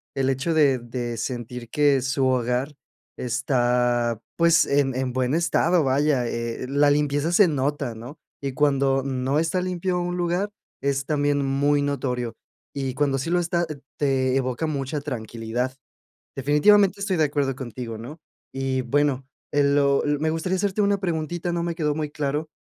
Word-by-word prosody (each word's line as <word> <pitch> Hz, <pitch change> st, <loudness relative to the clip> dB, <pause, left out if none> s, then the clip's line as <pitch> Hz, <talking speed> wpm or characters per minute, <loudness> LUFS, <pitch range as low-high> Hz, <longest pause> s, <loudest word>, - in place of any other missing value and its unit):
El 135 Hz, -1 st, +1 dB
hecho 135 Hz, +5 st, 0 dB
de 145 Hz, -4 st, +4 dB
de 120 Hz, 0 st, -5 dB
sentir 120 Hz, +1 st, -5 dB
que 145 Hz, 0 st, +3 dB
su 135 Hz, +1 st, 0 dB
hogar 130 Hz, +3 st, 0 dB, 0.4 s
está, 120 Hz, -2 st, +1 dB, 0.2 s
pues, 170 Hz, 0 st, +5 dB
en 140 Hz, -2 st, +1 dB
en 130 Hz, 0 st, -1 dB
buen 130 Hz, +1 st, 0 dB
estado, 170 Hz, +1 st, +2 dB
vaya, 135 Hz, -1 st, +2 dB
eh, 115 Hz, +1 st, -3 dB
la 145 Hz, +1 st, +4 dB
limpieza 145 Hz, +2 st, +1 dB
se 190 Hz, 0 st, +6 dB
nota, 140 Hz, -3 st, -1 dB
¿no? 120 Hz, +7 st, -10 dB, 0.2 s
Y 140 Hz, -2 st, -3 dB
cuando 135 Hz, -2 st, +2 dB
no 135 Hz, +1 st, -1 dB
está 165 Hz, +3 st, +1 dB
limpio 180 Hz, 0 st, -1 dB
un 175 Hz, 0 st, -2 dB
lugar, 175 Hz, +3 st, 0 dB, 0.3 s
es 140 Hz, 0 st, 0 dB
también, 145 Hz, -2 st, +1 dB
muy 145 Hz, +2 st, +2 dB
notorio. 125 Hz, -4 st, -2 dB, 0.4 s
Y 135 Hz, -2 st, -3 dB
cuando 140 Hz, -1 st, +1 dB
sí 135 Hz, +5 st, -3 dB
lo 180 Hz, -, +3 dB
está, 170 Hz, 0 st, 0 dB
eh, 150 Hz, -2 st, -6 dB, 0.2 s
te 130 Hz, -2 st, +1 dB
evoca 130 Hz, +4 st, -1 dB
mucha 145 Hz, -1 st, -2 dB
tranquilidad. 120 Hz, -1 st, -4 dB, 0.6 s
Definitivamente, 190 Hz, +9 st, +4 dB
estoy 200 Hz, -2 st, 0 dB
de 160 Hz, -, +3 dB
acuerdo 140 Hz, -3 st, -1 dB
contigo, 120 Hz, -3 st, -6 dB
¿no? 140 Hz, +9 st, -9 dB, 0.4 s
Y 130 Hz, -1 st, -1 dB
bueno, 135 Hz, +1 st, +1 dB, 0.2 s
eh, 145 Hz, 0 st, +2 dB
lo 140 Hz, -1 st, +3 dB
l 145 Hz, -1 st, +1 dB
Me 155 Hz, +1 st, +1 dB
gustaría 165 Hz, +3 st, -1 dB
hacerte 200 Hz, +2 st, -1 dB
una 200 Hz, -1 st, +2 dB
preguntita, 175 Hz, -1 st, -2 dB
no 170 Hz, 0 st, -1 dB
me 170 Hz, -1 st, -2 dB
quedó 150 Hz, -3 st, 0 dB
muy 150 Hz, -2 st, -2 dB
claro. 150 Hz, +2 st, -2 dB
140 Hz, 165 wpm, -24 LUFS, 130-155 Hz, 0.6 s, se